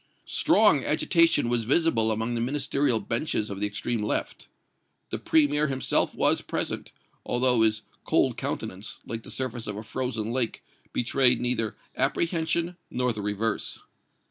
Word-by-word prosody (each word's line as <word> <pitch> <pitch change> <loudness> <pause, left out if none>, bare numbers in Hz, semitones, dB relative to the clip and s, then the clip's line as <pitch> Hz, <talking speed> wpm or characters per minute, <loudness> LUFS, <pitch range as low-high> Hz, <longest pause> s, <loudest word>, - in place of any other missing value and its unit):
Strong - - +4
agitation 330 - +3
was 120 -1 +1
visible 120 -4 +3
among 110 +2 -1
the 115 - -1
Ministerial 140 -1 +1
benches 115 -3 -2
of 100 - -5
the 105 - +1
extreme 105 +2 -2
left. 105 - -2 0.6
The - - -2
Premier 150 -1 +3
himself 135 -2 +1
was - - +2
present, - - -3 0.3
although 125 -1 +2
his 110 -1 +2 0.2
cold - - +2
countenance, 95 +4 -4
like 115 0 -5
the - - -13
surface 125 -3 -4
of 105 -1 -4
a 110 - -6
frozen 115 -2 -3
lake, 125 -2 -2 0.3
betrayed 125 0 +2
neither 120 -3 -1 0.2
apprehension 165 +4 0
nor 125 -1 0
the 105 - -5
reverse. 105 +1 -2
120 Hz, 145 wpm, -26 LUFS, 110-135 Hz, 0.6 s, Strong